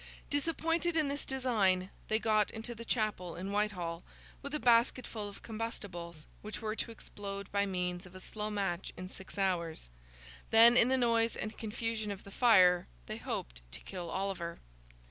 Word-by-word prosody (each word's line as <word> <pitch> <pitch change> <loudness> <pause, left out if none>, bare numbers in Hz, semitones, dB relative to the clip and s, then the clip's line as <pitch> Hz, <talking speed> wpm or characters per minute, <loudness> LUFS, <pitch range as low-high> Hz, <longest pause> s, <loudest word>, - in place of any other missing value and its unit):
Disappointed 330 +3 +1
in 310 -3 +3
this 280 0 -3
design, 205 -8 +2 0.2
they 220 - +3
got 215 -2 +3
into 225 +2 -5
the 230 0 -8
chapel 215 -7 -1
in 190 +3 -4
Whitehall, 180 -5 -1 0.4
with 280 +2 -4
a - - 0
basketful 235 -3 +2
of 200 - -13
combustibles, 185 -8 -5 0.2
which 215 0 -6
were 215 -1 -2
to - - -2
explode 200 -3 -7
by 200 0 +2
means 180 -1 -2
of 180 - -15
a - - -8
slow 210 +2 -4
match 195 -4 -2
in 185 0 -6
six 190 0 -9
hours; 170 - -1 0.6
then, 230 +2 +8
in 240 - +6
the 260 +1 +3
noise 230 -2 +3
and 215 0 -4
confusion 225 0 -3
of 200 -1 -5
the 200 - -11
fire, 185 -7 +6 0.2
they - - -5
hoped - - -4
to 70 - -4
kill 180 -3 -6
Oliver. 185 -3 -3
210 Hz, 170 wpm, -33 LUFS, 185-230 Hz, 0.6 s, then